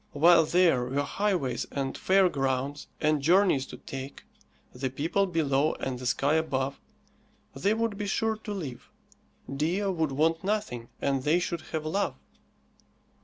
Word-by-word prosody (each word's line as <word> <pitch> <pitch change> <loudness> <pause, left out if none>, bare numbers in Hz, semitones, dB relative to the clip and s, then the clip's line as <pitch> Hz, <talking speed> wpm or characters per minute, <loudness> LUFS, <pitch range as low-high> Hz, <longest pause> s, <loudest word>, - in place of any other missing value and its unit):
While 165 +2 +6
there 165 -7 +3
were 135 +3 -1
highways 175 -9 -1
and 135 -1 -3
fairgrounds, 145 -7 +1
and 155 -1 +2
journeys 170 -3 +3
to - - -9
take, 135 +1 -8 0.5
the 130 +1 -3
people 165 +9 0
below 155 -4 +1
and 130 -2 -4
the 125 - -4
sky 140 +4 +1
above, 140 -4 -1 0.8
they 205 +2 +1
would 225 -2 -1
be 205 - -2
sure 220 +2 0
to 215 -1 -8
live, 150 -12 -6 0.7
Dea 165 +8 0
would 165 -6 0
want 160 +5 +1
nothing, 195 - -2
and 135 -1 +1
they 150 +5 +3
should 170 -1 -2
have 155 -1 -3
love. 195 +6 -1
155 Hz, 145 wpm, -28 LUFS, 135-185 Hz, 0.8 s, While